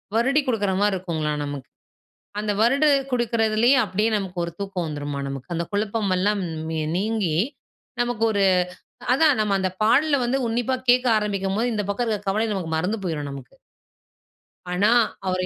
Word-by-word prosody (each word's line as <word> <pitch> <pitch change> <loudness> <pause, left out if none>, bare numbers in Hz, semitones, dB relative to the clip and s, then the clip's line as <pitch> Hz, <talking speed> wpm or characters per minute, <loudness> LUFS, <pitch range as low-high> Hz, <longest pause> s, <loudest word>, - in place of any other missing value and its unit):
வருடிக் 270 +5 +2
குடுக்குறமாரி 205 -3 +1
இருக்கும்ங்லாம் 155 -5 -2
நமக்கு. 140 -3 -6 0.7
அந்த 210 0 -1
வருடி 270 +6 +3 0.3
குடுக்குறதுலே 230 -1 +2
அப்படியே 210 +3 0
நமக்கு 190 -3 -5
ஒரு 170 - -5
தூக்கம் 190 -4 -3
வந்துருமாம் 145 -2 -4
நமக்கு. 135 +3 -7
அந்த 170 - -1
குழப்பம் 205 -1 -1
எல்லாம் 200 +2 +1
ன் 160 -1 -3
நீங்கி 205 -6 0 0.6
நமக்கு 240 -2 -1
ஒரு 200 -2 +1 0.7
அதான் 290 -1 +4
நம்ம 210 -2 +1
அந்த 190 0 0
பாடல 285 +7 +4
வந்து 255 +3 +1
உன்னிப்பா 240 +3 0
கேட்க 250 +1 +5
ஆரம்பிக்கும்போது, 205 +2 -1
இந்த 210 -1 -1
பக்கம் 220 +4 -1
இருக்கிற 210 -2 -2
கவலை 215 +3 +1
நமக்கு 175 -5 -4
மறந்து 185 +7 -1
போயிரும் 150 -5 -3
நமக்கு. 135 -3 -10 1.2
ஆனா, 190 +4 +2 0.4
அவரு 185 0 0
205 Hz, 150 wpm, -23 LUFS, 175-225 Hz, 1.2 s, கேட்க